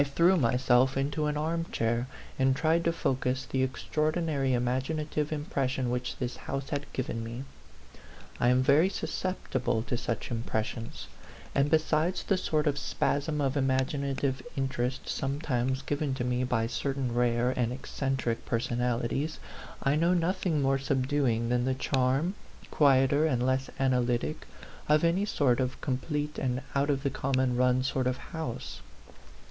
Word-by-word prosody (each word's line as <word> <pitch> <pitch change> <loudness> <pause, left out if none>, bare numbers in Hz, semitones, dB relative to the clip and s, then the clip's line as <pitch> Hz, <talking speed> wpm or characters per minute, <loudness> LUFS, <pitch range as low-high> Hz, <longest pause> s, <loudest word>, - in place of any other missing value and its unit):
19 140 -1 -2
threw 175 +3 +5
myself 125 -1 +3
into 145 +3 0
an 150 0 -1
arm 165 +2 0
chair 115 -3 -1 0.3
and 130 0 +3
tried 160 +3 +2
to 170 - +2
focus 130 -4 -1
the 130 - -1
extraordinary 150 +2 0
imaginative 135 +5 -1
impres 145 -3 -1
sion 130 -2 -1
which 125 0 -2
this 125 -1 -3
house 135 0 -4
had 145 0 -3
given 115 -3 -3
me. 115 +3 -5 1.0
I 120 - +3
am 125 +1 +4
very 150 +7 +5
susceptible 130 - -2
to 120 - -2
such 115 0 -3
impressions; 115 0 -3 0.5
and 140 +1 +2
besides 155 +3 +2
the 195 - +2
sort 155 -4 0
of 145 -1 +1
spasm 150 +2 0
of 135 0 0
imaginative 135 0 0
interest 130 -1 -2
sometimes 135 -2 -1
given 145 -2 -1
to 130 - -2
me 125 +1 0
by 115 -3 +1
certain 135 +1 -2
rare 120 0 +2
and 125 -2 0
eccentric 130 -2 -2
personalities, 120 +5 -1 0.5
I 140 +1 +3
know 170 +3 +3
noth 180 +2 0
ing 155 -5 +1
more 135 0 +2
subduing 130 -3 +1
than 120 0 +1
the 130 0 +1
charm, 135 +6 +1 0.4
quieter 140 +1 +4
and 125 -4 +1
less 130 +1 +1
analytic, 125 +2 0 0.4
of 150 +1 +4
any 175 +4 +2
sort 140 - +2
of 130 -1 -1
complete 150 +3 -2
and 130 -1 -1
out 140 +1 +1
of 140 -1 0
the 140 - 0
common 130 -1 0
run 125 +1 +3
sort 130 -1 0
of 125 0 0
house. 160 -4 -6
135 Hz, 155 wpm, -29 LUFS, 125-150 Hz, 1.0 s, threw